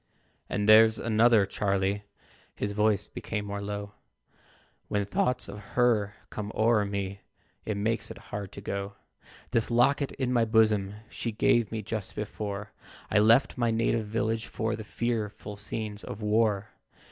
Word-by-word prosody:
"And 105 0 -1
there's 110 +1 +7
another, 115 -2 +4
Charlie 100 0 0 0.5
(His 100 - -2
voice 105 -1 +1
became 105 -2 -4
more 100 0 -4
low), 100 0 -5 1.0
When 100 -1 0
thoughts 125 +5 0
of 100 +1 -7
HER 110 -4 +2 0.2
come 105 0 -4
o'er 110 -1 +3
me, 100 -1 -4 0.5
It 105 -2 -1
makes 110 +2 0
it - - -8
hard 100 -2 -7
to 100 - -8
go. 100 0 -4 0.6
This 115 - +1
locket 130 +4 +3
in 130 -2 -1
my 120 -2 +4
bosom, 110 -3 +3
She 115 0 -4
gave 110 0 +2
me 110 -1 -3
just 105 0 -5
before 105 -1 -5 0.4
I 105 - +5
left 115 +5 +4
my 120 -1 +2
native 115 -1 +1
village 110 +1 -1
For 110 0 -2
the 110 - -7
fearful 110 -2 -3
scenes 105 0 -5
of 105 - -7
war. 105 -1 +1
105 Hz, 150 wpm, -28 LUFS, 100-115 Hz, 1.0 s, there's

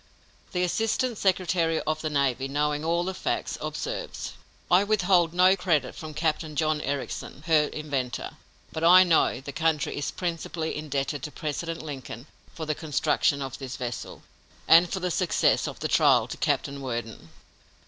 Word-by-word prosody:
The 180 0 0
assistant 225 +5 0
secretary 180 -4 +1
of 155 0 -2
the 155 - -2
navy, 135 -3 0
knowing 150 +2 -1
all 170 +2 +1
the 190 +1 -3
facts, - - -2
observes: - - -4 0.4
"I 180 +3 +6
withhold 185 -5 +3
no 180 +2 +5
credit 165 -8 0
from 155 -1 -8
Captain 155 0 -1
John 155 +1 +1
Ericsson, 140 0 -4
her 155 -3 +4
inventor, 140 -6 -3 0.4
but 160 - -4
I 180 +2 +8
know 165 -8 +2
the 140 - -7
country 160 -1 0
is 145 - -2
principally 165 -2 -3
indebted 145 -1 -2
to 150 - -6
President 165 +3 -4
Lincoln 135 -5 -7 0.3
for 160 - -5
the 155 - 0
construction 150 -2 +1
of 135 -2 -6
this 135 -1 -6
vessel, 120 -2 -6 0.4
and 170 +2 +7
for 190 - -1
the 180 -1 -2
success 180 0 +2
of - - -8
the - - 0
trial - - +4
to - - -6
Captain 140 0 -1
Worden." 115 -9 -5
155 Hz, 160 wpm, -26 LUFS, 140-175 Hz, 0.4 s, I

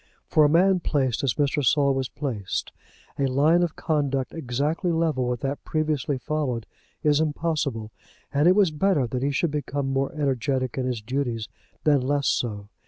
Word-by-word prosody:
For 155 - +4
a 145 - +5
man 185 +4 +4
placed 135 -8 0
as 135 - +1
Mr. 145 0 +1
Saul 140 +1 +3
was 135 -2 -2
placed 120 -10 -4 0.5
a 135 - +2
line 150 +6 +3
of 175 -3 -1
conduct 140 -5 -1
exactly 150 +5 -1
level 160 -6 +1
with 125 -1 -2
that 140 +1 -3
previously 150 -3 -1
followed 130 -4 -2 0.4
is 150 -1 +3
impossible, 150 -8 -1 0.4
and 145 +3 +3
it 180 - +6
was 200 -5 +4
better 155 -3 +2
that 125 +2 -3
he 140 - +1
should 145 +3 0
become 140 -2 -2
more 135 0 0
energetic 135 -3 -1
in 130 -1 -1
his 120 -4 -3
duties 120 -2 -2 0.4
than 145 -3 +4
less 140 +2 0
so. 105 -4 -1
140 Hz, 170 wpm, -25 LUFS, 130-155 Hz, 0.5 s, it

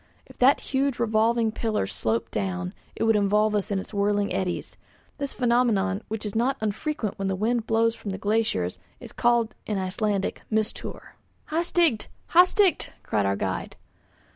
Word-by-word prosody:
If - - -17
that 265 +3 +5
huge 270 -1 +1
revolving 225 0 +2
pillar 220 - -1
sloped 110 +4 -2
down, 90 -2 -2 0.2
it - - -2
would 225 0 +4
involve 210 +1 +3
us 205 -2 0
in 200 - 0
its 190 - -6
whirling 205 0 +1
eddies. 185 -2 -2 0.4
This 280 -1 -2
phenomenon, 230 -5 +1
which 220 0 -4
is 205 - -4
not 250 +5 +1
unfrequent 215 +1 -2
when 195 - -1
the 190 - 0
wind 225 +3 0
blows 225 0 +3
from 215 - -7
the 190 - -3
glaciers, 200 - 0 0.2
is - - -10
called 235 -2 +2
in 210 - -1
Icelandic 195 +1 -1
'mistour.' 220 0 -3 0.4
"Hastigt! 330 -6 +2 0.2
hastigt!" 365 +2 +4
cried 105 -2 0
our 100 - +1
guide. 95 -1 -3
215 Hz, 160 wpm, -26 LUFS, 195-235 Hz, 0.4 s, that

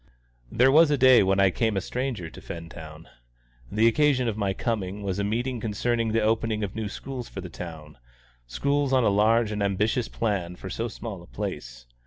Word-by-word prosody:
There 130 +3 +4
was 160 +2 +6
a 145 - +2
day 130 -1 +7
when 95 0 +2
I 100 -1 +5
came 110 +2 0
a - - +3
stranger 125 -3 -3
to - - -12
Fentown. 80 -1 -9 0.6
The 110 +2 +2
occasion 130 0 +3
of 110 - -1
my 100 -2 0
coming 100 -1 -3
was 100 0 -2
a - - 0
meeting 120 +4 -1
concerning 115 +1 -1
the 110 0 +1
opening 110 0 0
of 100 - -4
new 110 -2 -3
schools 125 +2 -7
for - - -7
the 90 - -8
town 80 -5 -9 0.5
schools 140 - 0
on 130 -2 +4
a 110 - +4
large 110 +2 +3
and 105 -1 -3
ambitious 105 +4 0
plan 95 -6 -2
for 95 +1 -8
so 115 - -2
small 110 -4 -7
a - - -15
place. - - -6
105 Hz, 200 wpm, -26 LUFS, 95-120 Hz, 0.6 s, day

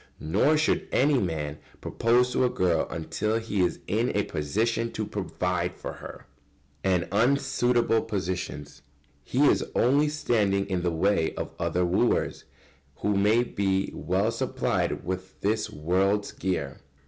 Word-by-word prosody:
Nor 105 - +2
should 155 - +1
any 140 0 +3
man 80 -6 -3 0.2
propose 125 +2 +2
to - - +2
a 125 - +3
girl 85 -7 +1
until 105 +7 -2
he 110 -4 -1
is 90 - 0
in - - 0
a - - +2
position 115 +10 -1
to 110 - -2
provide 90 -2 -2
for - - -6
her. - - -10 0.6
[Sidenote: 90 -2 +1
And 115 +5 +4
unsuitable 125 -4 +2
positions.] 85 -7 -4 0.4
He 135 - +2
is - - +4
only 140 +5 +3
standing 105 -10 +1
in 95 -2 -1
the 90 - +1
way 85 0 +1
of - - -5
other 85 +2 0
wooers 95 +7 +1 0.6
who 105 0 +1
may 105 +4 +3
be 95 -4 -1
well 95 +5 0
supplied 115 - -1
with 95 +1 -5
this 105 +1 0
world's 95 +6 0
gear. 70 -8 -3
100 Hz, 145 wpm, -27 LUFS, 90-115 Hz, 0.6 s, And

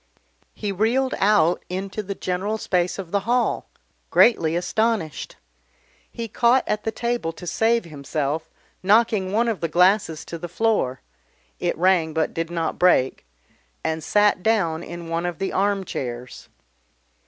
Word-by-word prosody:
He 205 -2 -3
reeled 235 +7 +1
out 195 -4 +3
into 190 +3 -4
the 200 -1 -5
general 190 +5 -2
space 180 -4 0
of 185 -4 -7
the 200 - +2
hall, 240 +4 0 0.4
greatly 165 -9 +4
astonished. 205 -2 -1 0.7
He 230 -1 -5
caught 240 +4 +3
at 210 0 -2
the 220 - 0
table 235 -7 -2
to 175 - -10
save 225 +6 +1
himself, 150 0 -3 0.3
knocking 205 -1 +3
one 230 +3 +2
of 225 -4 -1
the 165 - -1
glasses 180 -1 +2
to 170 - -7
the 175 +1 -6
floor 180 - 0 0.6
it 175 -3 -1
rang 170 -3 +2
but 160 -1 0
did 165 0 -3
not 165 -2 -2
break 130 - +3 0.6
and 160 0 -2
sat 205 +1 +3
down 180 -7 +1
in 175 -1 -8
one 165 +1 -1
of 175 -2 -4
the 195 - -3
armchairs. 165 -12 -3
185 Hz, 145 wpm, -23 LUFS, 165-215 Hz, 0.7 s, greatly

